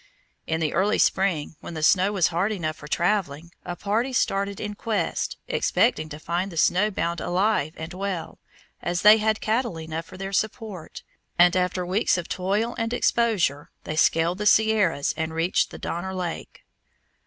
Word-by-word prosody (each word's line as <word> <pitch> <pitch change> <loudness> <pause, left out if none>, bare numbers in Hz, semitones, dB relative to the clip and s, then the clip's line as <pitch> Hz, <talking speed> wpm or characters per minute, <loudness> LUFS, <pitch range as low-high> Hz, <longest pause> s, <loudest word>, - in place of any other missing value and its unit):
In 160 0 -1
the 155 - 0
early 200 +4 +2
spring, 170 -6 +1
when 170 - -8
the 155 - -4
snow 185 +4 +4
was 190 -5 +2
hard 180 +5 0
enough 155 -6 -3
for 150 - -11
traveling, 170 -2 -1
a 175 - -5
party 225 +8 -1
started 200 -4 0
in 210 0 -4
quest, 215 0 -2
expecting 155 -10 +1
to 150 - -7
find 175 +5 -2
the 165 - -9
snow 185 +6 +3
bound 170 -4 -2
alive 180 -4 +1
and 160 +2 -7
well, 185 -3 -4 0.4
as 175 0 -2
they 210 +1 +9
had 220 0 0
cattle 225 -5 -1
enough 160 0 -5
for 165 - -12
their 195 +1 -5
support, 210 -4 -3 0.3
and, 175 0 +6
after 180 0 0
weeks 185 +2 +1
of 175 - -4
toil 205 +6 -1
and 225 +1 -1
exposure, 210 - +1
they 155 - -4
scaled 165 +3 +2
the 210 - 0
Sierras 210 -9 +3
and 160 0 -3
reached 165 +3 +1
the - - -9
Donner 190 +3 -4
Lake. 180 -2 -6
185 Hz, 175 wpm, -25 LUFS, 165-210 Hz, 0.4 s, they